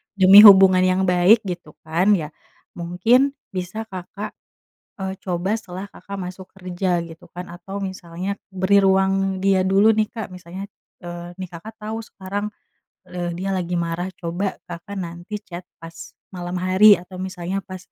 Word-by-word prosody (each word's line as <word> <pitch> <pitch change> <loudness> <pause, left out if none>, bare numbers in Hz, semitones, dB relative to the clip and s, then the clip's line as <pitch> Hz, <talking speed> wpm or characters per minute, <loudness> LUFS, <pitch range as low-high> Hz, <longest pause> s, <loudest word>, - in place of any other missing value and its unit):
demi 195 +1 +8
hubungan 190 -2 +8
yang 185 +1 +2
baik, 180 +4 +4
gitu 175 -5 -7
kan, 175 +6 +3
ya, 155 -4 -4 0.4
mungkin 225 +11 +2 0.2
bisa 185 +4 -4
Kakak, 190 +3 -7 0.7
eee, 190 0 -4
coba 180 0 -2
setelah 185 -2 -8
Kakak 200 +2 -9
masuk 185 0 -7
kerja, 180 -1 -2
gitu 165 -1 -12
kan, 180 0 -9
atau 195 +3 -7
misalnya 190 +1 -5 0.2
beri 190 +2 +4
ruang 195 0 +2
dia 190 -1 +3
dulu 200 +3 +5
nih, 215 -1 +1
Kak. 220 -4 -5
Misalnya, 180 +1 -8 0.4
eee, 175 0 -8
nih 185 -1 -7
Kakak 195 +6 -10
tahu 220 +1 -5
sekarang, 205 -2 -5 0.6
eee, 175 -1 -4
dia 190 +3 -3
lagi 180 -2 -2
marah. 175 +2 -2
Coba 180 +3 -3 0.2
Kakak 170 +4 -7
nanti 180 +3 -6
chat 180 -3 -9 0.2
pas, 165 0 -11 0.2
malam 175 0 -4
hari 185 +3 +6
atau 180 +2 -13
misalnya 185 +1 -4
pas, 185 0 -9
185 Hz, 155 wpm, -22 LUFS, 175-195 Hz, 0.7 s, demi